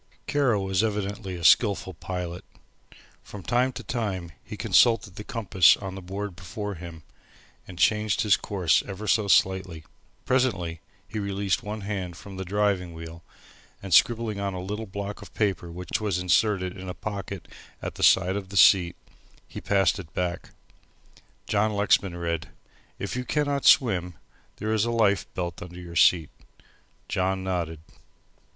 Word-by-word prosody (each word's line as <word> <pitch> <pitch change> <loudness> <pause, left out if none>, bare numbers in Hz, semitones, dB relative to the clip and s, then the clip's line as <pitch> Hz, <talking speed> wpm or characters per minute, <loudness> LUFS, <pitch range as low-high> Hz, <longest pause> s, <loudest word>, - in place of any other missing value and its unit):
Kara 140 -7 +2
was 95 +1 0
evidently 100 -2 -3
a 85 - -8
skilful 100 0 +4
pilot. 90 +1 -5 0.8
From 100 -3 -10
time 125 +7 +1
to 125 - -7
time 100 -9 -3
he - - -8
consulted 115 -5 +3
the 105 - -7
compass 100 - +4
on 95 -2 -6
the 95 - -7
board 95 +1 -5
before 100 +2 -6
him, 85 -2 -10 0.6
and 90 - -10
changed 105 +5 +2
his 105 -4 +4
course 90 -5 +1
ever 100 +1 -6
so 105 0 +2
slightly. 95 -3 +2 0.4
Presently 95 -11 0 0.3
he 110 +2 -5
released 100 +2 -1
one 105 -1 -5
hand 95 -4 -4
from 100 0 -10
the 95 - -4
driving 95 -2 0
wheel, 80 +1 -9 0.6
and 95 -3 -3
scribbling 115 +1 +3
on 100 -1 -2
a - - -4
little 105 +4 -5
block 100 +2 -6
of 100 - -13
paper 95 -5 -1
which 90 +4 -4
was 100 -4 0
inserted 90 0 +1
in 95 -1 -8
a 90 - -5
pocket 100 -3 -6 0.3
at - - -5
the - - -9
side 95 0 +5
of 100 -2 -5
the 100 - -4
seat 90 -3 +6 0.5
he - - -8
passed 100 0 +2
it 85 -4 -10
back. 90 0 -2 1.0
John 105 +1 +1
Lexman 100 -3 +2
read: 85 -2 -3 0.5
"If - - -4
you 125 - -2
cannot 145 0 -1
swim 90 - +4 0.4
there 110 +1 -2
is 110 -2 +2
a 120 - 0
life 110 -4 +1
belt 85 -2 -4
under 90 0 -9
your 85 -1 -9
seat." 85 -2 +4 0.8
John 95 0 -1
nodded. 85 -4 -3
95 Hz, 160 wpm, -26 LUFS, 90-105 Hz, 1.0 s, seat